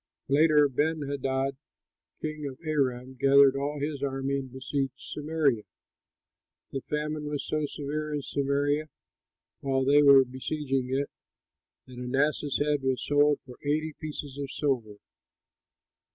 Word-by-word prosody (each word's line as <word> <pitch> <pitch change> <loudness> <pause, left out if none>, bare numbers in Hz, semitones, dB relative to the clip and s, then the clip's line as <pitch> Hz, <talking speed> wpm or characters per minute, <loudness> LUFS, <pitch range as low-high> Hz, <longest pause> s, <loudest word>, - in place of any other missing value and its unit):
Later, 150 +1 +5
Benhadad, 140 -2 -1 0.7
king 155 -1 -3
of 130 -2 -7
Aram, 130 -4 -1
gathered 140 0 +6
all 145 +2 -2
his 145 -1 -3
army 135 0 -1
and 130 -2 -8
besieged 135 0 -2
Samaria. 150 -6 0 1.1
The 135 - -3
famine 150 +1 -3
was 150 -1 -3
so 155 -1 -1
severe 150 +2 -4
in 145 -1 -2
Samaria 145 +2 0 0.7
while 135 -1 0
they 145 +2 +6
were 140 -2 +8
besieging 130 0 -2
it, 140 +2 -1 0.7
that 125 -1 -11
an 125 +1 -3
ass's 145 0 +1
head 145 -1 +1
was 130 -1 -1
sold 145 0 +3
for 125 -2 -12
eighty 155 +2 0
pieces 145 -3 -7
of 140 -1 -4
silver. 125 -8 -1
140 Hz, 130 wpm, -28 LUFS, 135-150 Hz, 1.1 s, were